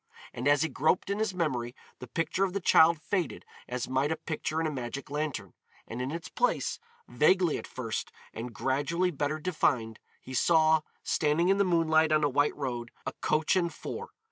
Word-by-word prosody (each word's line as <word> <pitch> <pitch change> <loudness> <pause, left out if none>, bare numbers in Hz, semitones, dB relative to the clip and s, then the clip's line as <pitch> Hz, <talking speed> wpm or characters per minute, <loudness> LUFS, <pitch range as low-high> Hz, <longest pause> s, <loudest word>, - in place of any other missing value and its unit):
And 125 +3 -2
as 145 +1 +4
he - - +1
groped 160 +7 +1
in 200 - -1
his 220 -2 0
memory 130 -8 -1 0.2
the 125 - -8
picture 165 +8 -1
of 190 -2 0
the 200 - -1
child 165 -3 +5
faded 175 -1 -2 0.2
as 125 -1 -3
might 135 +3 +1
a - - +1
picture 155 0 -3
in 165 - 0
a 155 - 0
magic 130 0 -5
lantern, 150 -1 -3 0.3
and 120 +2 -5
in 130 - -2
its 165 +3 -5
place, - - 0 0.3
vaguely 175 +2 +3
at - - -9
first 115 -4 -4 0.2
and 120 +2 -6
gradually 145 +9 0
better 145 0 -1
defined, 135 -9 0 0.2
he 130 - -10
saw, 160 +3 +4 0.2
standing 160 +4 +2
in 195 +1 +3
the - - +5
moonlight, 160 -3 +3
on 155 0 +3
a 145 - +3
white 145 +2 +2
road, 120 -4 -4 0.2
a - - -3
coach 155 +4 +2
and 170 -2 0
four. 465 +1 -6
155 Hz, 195 wpm, -29 LUFS, 130-170 Hz, 0.3 s, child